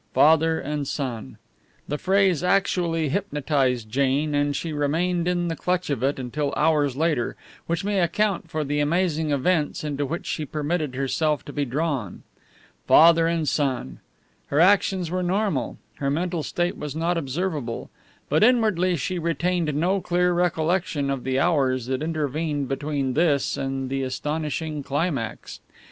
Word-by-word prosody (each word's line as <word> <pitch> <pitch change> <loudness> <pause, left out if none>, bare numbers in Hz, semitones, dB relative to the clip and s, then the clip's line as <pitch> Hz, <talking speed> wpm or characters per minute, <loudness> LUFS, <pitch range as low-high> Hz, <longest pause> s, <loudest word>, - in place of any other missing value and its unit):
Father 160 +1 +4
and 145 -1 -3
son! 120 - -4 0.5
The 150 - -3
phrase 190 -3 +2
actually 180 -4 +1
hypnotized 140 - 0
Jane, 140 +3 +1
and 145 0 +1
she 165 +1 -3
remained 170 +4 0
in 175 -1 0
the 165 - -2
clutch 180 -1 -1
of 135 -5 -1
it 135 +2 +1
until 140 +3 -2
hours 150 -4 +2
later, 155 -6 0 0.3
which 170 +3 -1
may 200 -1 0
account 185 +2 0
for 155 -1 -2
the 145 +1 -1
amazing 160 0 +1
events 150 +3 0
into 145 -1 -2
which 165 +5 -4
she 155 - -2
permitted 150 -1 -2
herself 145 +2 0
to 145 - -8
be 145 -1 -1
drawn. 135 - -3 0.6
Father 165 0 +7
and 165 -2 0
son! 135 - -1 0.5
Her 145 - 0
actions 185 -1 +3
were 185 0 -1
normal; 180 - -1 0.2
her 140 - -1
mental 170 +3 -1
state 175 +5 -2
was 150 -1 -5
not 165 +2 0
observable; 145 -4 -3 0.4
but - - +2
inwardly 215 -7 +3
she 175 +4 -2
retained 170 0 0
no 185 +6 +1
clear 180 0 +1
recollection 170 -3 0
of 135 -2 -3
the 130 0 0
hours 135 -7 +2
that 130 +1 -2
intervened 155 -2 -2
between 135 -1 -2
this 150 -3 +2
and 135 0 -3
the 135 +1 -2
astonishing 150 +3 -3
climax. 140 -4 -3
155 Hz, 150 wpm, -24 LUFS, 140-175 Hz, 0.6 s, Father